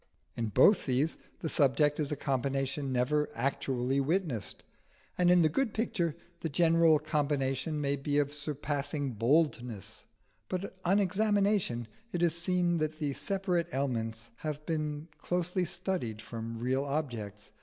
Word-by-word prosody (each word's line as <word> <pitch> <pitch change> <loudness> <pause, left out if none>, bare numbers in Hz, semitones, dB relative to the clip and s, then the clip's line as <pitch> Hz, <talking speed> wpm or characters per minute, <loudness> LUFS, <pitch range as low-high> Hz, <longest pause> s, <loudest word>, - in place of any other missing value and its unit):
In 115 - -1
both 175 - +5
these 135 +5 +1 0.2
the 165 - -2
subject 145 0 +3
is 150 -1 -1
a - - 0
combination 135 +1 -1
never 140 +4 +1
actually 135 -1 0
witnessed, 145 - -1 0.5
and 180 -1 +3
in 180 -1 +6
the - - +6
good 220 - 0
picture 170 -8 0 0.2
the 165 - -3
general 165 +1 +5
combination 145 -1 -1
may 140 -1 +1
be 145 +1 -1
of 145 0 +1
surpassing 145 -1 -2
boldness; 120 - 0 0.4
but 190 +1 -3
on 190 +3 +3
examination 200 - +1 0.2
it 175 -4 -1
is 170 -1 +3
seen 175 0 +1
that 155 -1 -1
the 145 -3 -1
separate 185 0 0
elements 115 -4 -2
have 150 -1 -5
been 155 -1 -2
closely 180 +1 0
studied 170 - -2
from 115 +1 -6
real 130 +4 0
objects. 115 -8 -4
150 Hz, 140 wpm, -31 LUFS, 130-170 Hz, 0.5 s, in